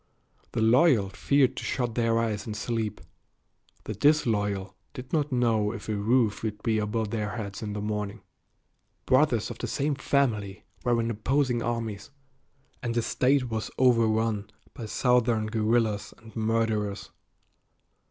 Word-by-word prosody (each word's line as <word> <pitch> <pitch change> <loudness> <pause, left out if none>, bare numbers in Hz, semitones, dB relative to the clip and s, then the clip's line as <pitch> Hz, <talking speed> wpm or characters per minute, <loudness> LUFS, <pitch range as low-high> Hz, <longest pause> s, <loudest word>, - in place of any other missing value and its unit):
The 115 - +1
loyal 120 - +4
feared 130 +6 +2
to - - -4
shut 120 -3 -1
their 115 -1 +1
eyes 110 -3 -1
in 105 - -4
sleep; 110 -1 -3 0.8
the 110 - -4
disloyal 105 -7 +1 0.2
did 125 0 -9
not 150 -2 +1
know 115 -4 +2
if 120 - -8
a 110 - -1
roof 110 +1 +2
would 105 -2 -4
be 110 -1 +1
above 105 0 -2
their 105 -1 -2
heads 100 -4 -5
in 105 -2 -4
the 105 - -4
morning. 105 0 -3 0.8
Brothers 130 -5 +3
of 115 - -9
the - - -3
same 145 +1 0
family 115 -8 0 0.2
were 120 -1 +2
in 115 0 0
opposing 125 +2 0
armies, 115 -3 -3 0.7
and 120 -1 -2
the 120 - +1
State 130 0 +1
was 110 0 -2
overrun 115 -4 +2 0.2
by 115 - -7
Southern 120 -2 +2
guerrillas 110 -1 0
and 110 -1 -16
murderers. 110 -2 -1
115 Hz, 145 wpm, -27 LUFS, 105-125 Hz, 0.8 s, loyal